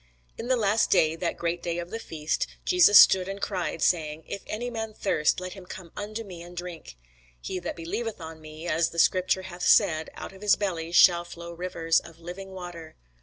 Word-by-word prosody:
In 230 Hz, -, -6 dB
the 255 Hz, -, +3 dB
last 220 Hz, -1 st, +2 dB
day, 160 Hz, -4 st, +3 dB
that 170 Hz, 0 st, -2 dB
great 170 Hz, 0 st, -2 dB
day 170 Hz, -1 st, -3 dB
of 175 Hz, 0 st, -5 dB
the 225 Hz, -, -4 dB
feast, 155 Hz, -7 st, -2 dB, 0.2 s
Jesus 360 Hz, -, +6 dB
stood 185 Hz, -1 st, +7 dB
and 195 Hz, 0 st, -5 dB
cried, 180 Hz, -5 st, -2 dB
saying, 160 Hz, -2 st, +1 dB
If 200 Hz, -, -6 dB
any 240 Hz, +3 st, -4 dB
man 220 Hz, -2 st, -5 dB
thirst, 155 Hz, -8 st, +1 dB
let 185 Hz, 0 st, -6 dB
him 190 Hz, -3 st, -12 dB
come 180 Hz, -3 st, -9 dB
unto 215 Hz, +2 st, -5 dB
me, 180 Hz, -5 st, -10 dB
and 175 Hz, +1 st, -12 dB
drink. 175 Hz, -, -7 dB, 0.4 s
He 185 Hz, -, -4 dB
that 175 Hz, -, -5 dB
believeth 205 Hz, +7 st, -4 dB
on 160 Hz, -1 st, -9 dB
me, 155 Hz, +2 st, -9 dB
as 165 Hz, 0 st, +1 dB
the 170 Hz, -, -11 dB
scripture 185 Hz, +2 st, +3 dB
hath 180 Hz, -1 st, -9 dB
said, 160 Hz, -2 st, +4 dB
out -, -, -8 dB
of 190 Hz, -, -15 dB
his 210 Hz, -1 st, +4 dB
belly 170 Hz, -5 st, -3 dB
shall 175 Hz, 0 st, +6 dB
flow 170 Hz, 0 st, -9 dB
rivers 165 Hz, -2 st, 0 dB
of 165 Hz, -1 st, -14 dB
living 180 Hz, +3 st, -8 dB
water. 175 Hz, -4 st, -9 dB
175 Hz, 210 wpm, -27 LUFS, 165-195 Hz, 0.4 s, stood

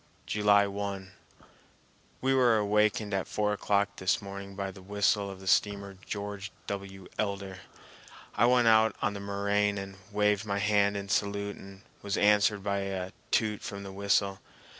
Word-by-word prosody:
July 105 Hz, -1 st, +4 dB
1. 100 Hz, -1 st, -4 dB, 1.1 s
We 135 Hz, +1 st, +2 dB
were 125 Hz, -4 st, +4 dB
awakened 105 Hz, 0 st, +1 dB
at 95 Hz, -1 st, -1 dB
four 105 Hz, -1 st, 0 dB
o'clock 100 Hz, 0 st, 0 dB
this 95 Hz, 0 st, +1 dB
morning 100 Hz, -1 st, -8 dB
by 100 Hz, -1 st, -3 dB
the 95 Hz, 0 st, -13 dB
whistle 100 Hz, +1 st, +1 dB
of 95 Hz, -1 st, -8 dB
the 95 Hz, -, -12 dB
steamer 100 Hz, 0 st, +1 dB
George 100 Hz, 0 st, -5 dB
W. 95 Hz, -1 st, -6 dB
Elder. 100 Hz, -2 st, -3 dB, 0.7 s
I 120 Hz, -, +4 dB
went 125 Hz, -1 st, +4 dB
out 110 Hz, -1 st, +5 dB
on 100 Hz, -, +1 dB
the 100 Hz, -, -6 dB
moraine 100 Hz, +1 st, 0 dB
and 95 Hz, 0 st, -7 dB
waved 105 Hz, 0 st, +2 dB
my 100 Hz, -2 st, -2 dB
hand 100 Hz, 0 st, +2 dB
in 100 Hz, 0 st, -5 dB
salute 100 Hz, 0 st, -1 dB
and 95 Hz, 0 st, -13 dB, 0.2 s
was 100 Hz, 0 st, -2 dB
answered 105 Hz, -1 st, +3 dB
by 100 Hz, 0 st, 0 dB
a 95 Hz, -1 st, -3 dB, 0.2 s
toot 105 Hz, -2 st, +1 dB
from 100 Hz, 0 st, -6 dB
the 95 Hz, -, -7 dB
whistle. 100 Hz, 0 st, +1 dB
100 Hz, 160 wpm, -29 LUFS, 100-105 Hz, 1.1 s, out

